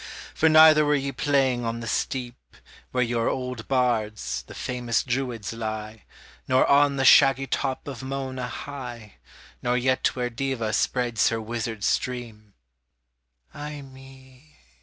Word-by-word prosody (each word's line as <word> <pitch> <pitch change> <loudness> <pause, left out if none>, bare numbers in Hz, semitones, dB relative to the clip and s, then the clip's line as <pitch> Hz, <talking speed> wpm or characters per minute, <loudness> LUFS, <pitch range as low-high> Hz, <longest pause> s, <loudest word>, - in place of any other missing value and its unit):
For 160 - +3
neither 155 -1 +7
were 150 0 +2
ye 140 -1 -2
playing 135 -4 +1
on 115 0 -3
the 120 - -6
steep, 120 +1 -4 0.3
Where 125 -1 +1
your 115 -1 0
old 125 -3 -4
bards, 110 - -1
the - - -11
famous 120 -2 -1
druids, 120 -4 -3
lie, 110 -1 -6 0.4
Nor 130 0 +4
on 140 0 +4
the 135 -1 0
shaggy 135 0 +6
top 135 0 -3
of 135 -3 -6
Mona 130 -1 -4
high, 120 - -8 0.4
Nor 125 0 +1
yet 130 +1 +1
where 125 -1 -2
Deva 120 -3 -2
spreads 120 0 +1
her 115 - -2
wizard 110 -1 -4
stream 115 -5 -3 1.0
Ay 150 -1 -7
me! 135 +1 -16
125 Hz, 140 wpm, -25 LUFS, 115-135 Hz, 1.0 s, neither